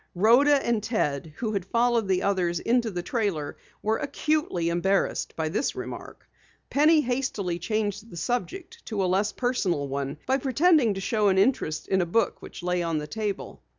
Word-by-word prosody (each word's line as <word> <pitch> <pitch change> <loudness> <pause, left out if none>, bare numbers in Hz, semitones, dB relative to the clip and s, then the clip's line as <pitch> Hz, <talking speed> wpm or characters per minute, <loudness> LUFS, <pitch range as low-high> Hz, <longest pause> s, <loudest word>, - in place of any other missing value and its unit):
Rhoda 240 +10 +5
and 235 -2 +1
Ted, 160 - -1
who 220 +3 -3
had 195 -3 -1
followed 235 +1 +1
the 185 -1 +1
others 180 -4 +1
into 235 -1 +1
the 180 -3 -4
trailer, 195 - -2 0.3
were 220 +1 +1
acutely 290 - -1
embarrassed 190 +3 0
by 160 -1 -1
the 220 - 0
remark. - - -8 0.4
Penny 305 +2 +5
hastily 245 -9 -2
changed 210 +2 -2
the 170 - -10
subject 360 - -4
to 205 -4 -1
a - - +2
less 190 +3 +1
personal 195 - -1
one 140 +2 -3
by 265 +1 +1
pretending 275 - +3
to 195 - -4
show 210 +1 +1
an 190 -1 +3
interest 190 -7 +1
in 190 -1 +2
a 175 - -1
book 230 +7 0
which - - -10
lay 180 0 0
on 165 -2 -1
the 150 - -3
table. 210 +3 -4
205 Hz, 180 wpm, -26 LUFS, 175-245 Hz, 0.4 s, Rhoda